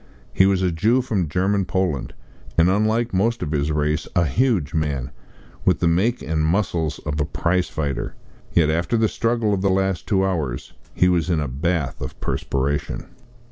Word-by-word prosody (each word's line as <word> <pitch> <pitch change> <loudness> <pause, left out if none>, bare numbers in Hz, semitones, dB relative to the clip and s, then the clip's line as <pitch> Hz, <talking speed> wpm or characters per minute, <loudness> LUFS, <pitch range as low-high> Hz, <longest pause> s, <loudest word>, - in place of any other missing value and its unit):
He 95 - +5
was 95 -1 +2
a 90 - +2
Jew 110 +10 +2
from 100 - -1
German 95 +4 +1
Poland, 90 -9 -1 0.4
and, 85 +2 +5
unlike 110 +3 +1
most 115 +6 +1
of 75 - -3
his 75 0 0
race, 75 +1 0
a 85 - +4
huge 95 - +1
man, 70 -4 -1 0.5
with - - +3
the 85 - +2
make 100 +9 +1
and 75 - -6
the 80 - +2
muscles 85 -5 0
of 75 0 -1
a - - +1
prize 90 +4 0
fighter. 75 -3 -3 0.4
Yet, 80 -3 +3
after 85 +9 0
the 110 0 +3
struggle 115 -2 0
of 95 - 0
the 100 - +2
last 95 -1 0
two 95 -3 +2
hours 75 -10 -3 0.2
he 90 - +4
was 90 -1 +1
in 85 -3 +2
a 75 - -1
bath 70 +1 -2
of - - -6
perspiration. 70 +2 -2
85 Hz, 185 wpm, -22 LUFS, 75-100 Hz, 0.5 s, He